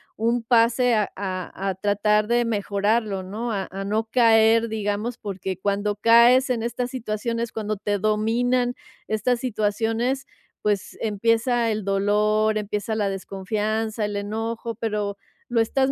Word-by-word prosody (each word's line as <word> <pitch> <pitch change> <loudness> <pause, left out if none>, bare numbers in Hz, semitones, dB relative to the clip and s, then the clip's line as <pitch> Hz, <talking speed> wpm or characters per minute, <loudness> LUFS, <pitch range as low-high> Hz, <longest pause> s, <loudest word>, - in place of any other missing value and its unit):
un 230 +1 0
pase 235 +1 +3
a 210 -2 +1
a 190 0 -4
a 190 - 0
tratar 210 +2 +1
de 240 0 +2
mejorarlo, 205 -1 0
¿no? 220 +5 -4
a 195 -2 -2
a 195 +1 -5
no 215 +3 0
caer, 225 -1 +5
digamos, 215 +2 -2
porque 190 -2 -5
cuando 205 +1 0
caes 235 +4 +5
en 235 -2 0
estas 240 +1 -3
situaciones, 230 -1 -3
cuando 215 -1 -3
te 205 0 -1
dominan 235 +4 +1 0.3
estas 230 +3 0
situaciones, 225 +3 -1 0.3
pues 205 -2 -1
empieza 230 +2 +1
el 215 -1 -2
dolor, 210 +2 +2
empieza 210 +1 -3
la 205 -2 0
desconfianza, 210 +3 -2
el 205 0 -4
enojo, 225 +3 -3
pero 210 -2 -2 0.3
lo 235 -1 +1
estás 265 +4 +2
215 Hz, 140 wpm, -24 LUFS, 205-230 Hz, 0.3 s, caer